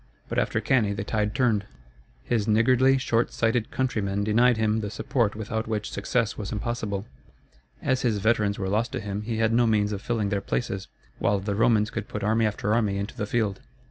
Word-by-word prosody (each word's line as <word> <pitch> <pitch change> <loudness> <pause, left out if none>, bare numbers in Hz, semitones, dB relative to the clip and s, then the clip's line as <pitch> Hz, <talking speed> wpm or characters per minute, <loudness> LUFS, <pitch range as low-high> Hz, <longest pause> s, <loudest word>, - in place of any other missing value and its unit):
But - - 0
after - - 0
Cannæ 110 -6 +2
the 100 - -3
tide 105 -1 -1
turned. 110 -6 +1 0.6
His 105 - 0
niggardly, 130 +5 +4
short 120 -3 +1
sighted 115 0 0
countrymen 100 -6 -1
denied 115 +3 +4
him 110 0 +1
the 105 -2 -3
support 110 0 0
without 110 +1 -3
which 105 -2 -3
success 115 +3 -1
was 100 - -4
impossible. 105 -2 -3 0.8
As 130 -1 +1
his 115 -4 +1
veterans 105 -1 +1
were 95 - -2
lost 110 +5 0
to 130 - -2
him 100 -2 -4
he 110 +1 -3
had 115 0 +2
no 120 0 +4
means 105 -2 +2
of 100 -2 -4
filling 110 -3 -1
their 100 -1 -1
places, 95 -5 -3 0.3
while 100 -1 +2
the 100 +1 -2
Romans 110 0 +3
could 115 -2 -4
put 105 - -5
army 110 +1 +2
after 105 0 -1
army 105 -4 +1
into 100 +1 -4
the 105 - -3
field. 105 -4 0
110 Hz, 200 wpm, -26 LUFS, 100-115 Hz, 0.8 s, niggardly